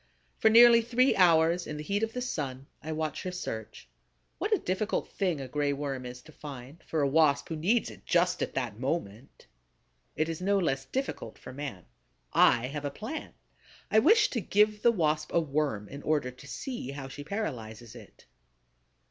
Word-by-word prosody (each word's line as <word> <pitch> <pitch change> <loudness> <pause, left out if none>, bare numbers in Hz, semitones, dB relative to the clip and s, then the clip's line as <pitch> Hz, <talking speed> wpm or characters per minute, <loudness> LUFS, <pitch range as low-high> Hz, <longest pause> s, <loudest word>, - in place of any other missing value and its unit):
For 220 - +5
nearly 235 +1 +8
three 245 +3 +2
hours, 170 -1 +4
in 150 - -5
the 150 - -5
heat 200 +6 -1
of 225 0 -1
the 250 - -3
sun, 135 - -4 0.2
I 160 - -5
watch 155 -1 -3
her 185 - -4
search. 110 - -6 0.5
What 420 - -2
a 425 - +5
difficult 205 - -2
thing 180 -7 -1
a 135 - -5
Gray 145 +2 0
Worm 135 -3 -4
is 125 0 -9
to 155 - -15
find, 140 0 -10
for 155 -3 0
a - - +3
Wasp 145 -1 +3
who 165 - -2
needs 200 +9 +1
it - - -14
just 180 0 +2
at - - -3
that 120 -5 -3
moment! 130 -4 -4 0.7
It 155 - 0
is 165 +1 -4
no 200 +2 +2
less 135 -7 0
difficult 265 - -4
for - - -10
man. 130 - -6 0.5
I 120 0 +5
have 145 +3 -5
a 145 - -1
plan. 220 - -7 0.6
I 220 - +6
wish 425 - +5
to 235 - -1
give 210 +2 +2
the 235 - +5
Wasp 155 -6 0
a - - +6
Worm 140 -9 -1
in 140 +5 -9
order 150 -5 0
to 125 +3 -15
see 140 - -5
how 135 -1 -6
she 135 +2 -8
paralyzes 120 - -5
it. 120 - -15
155 Hz, 190 wpm, -29 LUFS, 135-200 Hz, 0.7 s, nearly